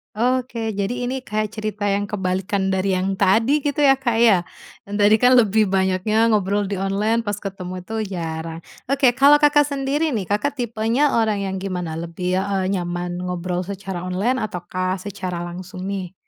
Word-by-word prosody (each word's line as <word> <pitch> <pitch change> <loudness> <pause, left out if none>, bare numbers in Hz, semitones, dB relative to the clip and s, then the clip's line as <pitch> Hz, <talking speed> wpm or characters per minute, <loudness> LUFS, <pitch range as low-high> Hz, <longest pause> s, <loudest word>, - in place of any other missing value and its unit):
Oke, 240 -1 0
jadi 200 +4 0 0.2
ini 260 0 -4
kayak 215 0 -1
cerita 215 -1 -2
yang 200 +1 0
kebalikan 190 0 -1
dari 190 0 0
yang 190 +1 -1
tadi 230 +10 +3
gitu 290 +1 0
ya 270 -2 +5
Kak 250 -4 -1
ya, 195 -7 +5 0.4
yang 200 - -9
tadi 210 +2 +6
kan 250 +2 +5
lebih 220 -3 +4
banyaknya 195 +4 +2
ngobrol 205 -1 +1
di 200 - -2
online, 210 +4 0
pas 205 - -1
ketemu 185 -2 -6
itu 215 0 -4
jarang. 165 -1 -5 0.2
Oke 275 -1 +3
kalau 290 +2 +6
Kakak 295 0 +5
sendiri 285 +1 -1
nih, 200 -5 -3
Kakak 210 +8 0
tipenya 235 +2 0
orang 215 -3 +1
yang 190 -1 -3
gimana? 180 -4 -4
Lebih, 180 +2 -2
eee, 195 -1 -1
nyaman 175 -1 -3
ngobrol 180 0 -3
secara 190 -2 -5
online 200 +8 0
ataukah 185 -2 -3
secara 185 -3 -5
langsung 180 +1 -7
nih? 190 -2 -4
200 Hz, 170 wpm, -21 LUFS, 185-230 Hz, 0.4 s, tadi